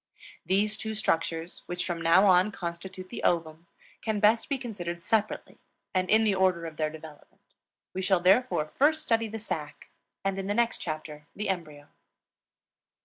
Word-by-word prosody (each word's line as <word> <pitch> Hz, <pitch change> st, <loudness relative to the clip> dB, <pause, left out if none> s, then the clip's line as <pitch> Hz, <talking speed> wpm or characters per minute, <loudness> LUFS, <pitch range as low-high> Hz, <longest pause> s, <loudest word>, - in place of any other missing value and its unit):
These 210 Hz, +3 st, +2 dB
two 220 Hz, 0 st, -4 dB
structures, 165 Hz, -4 st, -1 dB
which 175 Hz, 0 st, -3 dB
from 170 Hz, -2 st, -3 dB
now 170 Hz, +4 st, +5 dB
on 185 Hz, +1 st, +5 dB
constitute 185 Hz, +1 st, -6 dB
the -, -, -6 dB
ovum, 165 Hz, -1 st, 0 dB, 0.3 s
can 220 Hz, -2 st, -1 dB
best 220 Hz, +5 st, +3 dB
be 280 Hz, -, +1 dB
considered 175 Hz, -9 st, -5 dB
separately 215 Hz, +1 st, -1 dB, 0.3 s
and 185 Hz, -1 st, +1 dB
in 220 Hz, +1 st, +5 dB
the 210 Hz, -2 st, +3 dB
order 185 Hz, -3 st, +2 dB
of 160 Hz, -2 st, -7 dB
their 155 Hz, -1 st, 0 dB
development. 155 Hz, -1 st, -13 dB, 0.5 s
We 190 Hz, -, -3 dB
shall 190 Hz, -1 st, +3 dB
therefore 190 Hz, -1 st, +3 dB
first 300 Hz, -, +2 dB
study 230 Hz, -5 st, +1 dB
the 220 Hz, +1 st, -5 dB
sac 150 Hz, -9 st, -5 dB, 0.4 s
and 195 Hz, 0 st, 0 dB
in 195 Hz, -, -4 dB
the 205 Hz, -, 0 dB
next 235 Hz, +1 st, +1 dB
chapter 155 Hz, -2 st, -6 dB
the 210 Hz, 0 st, -3 dB
embryo. 155 Hz, -6 st, -4 dB
185 Hz, 165 wpm, -28 LUFS, 165-215 Hz, 0.5 s, now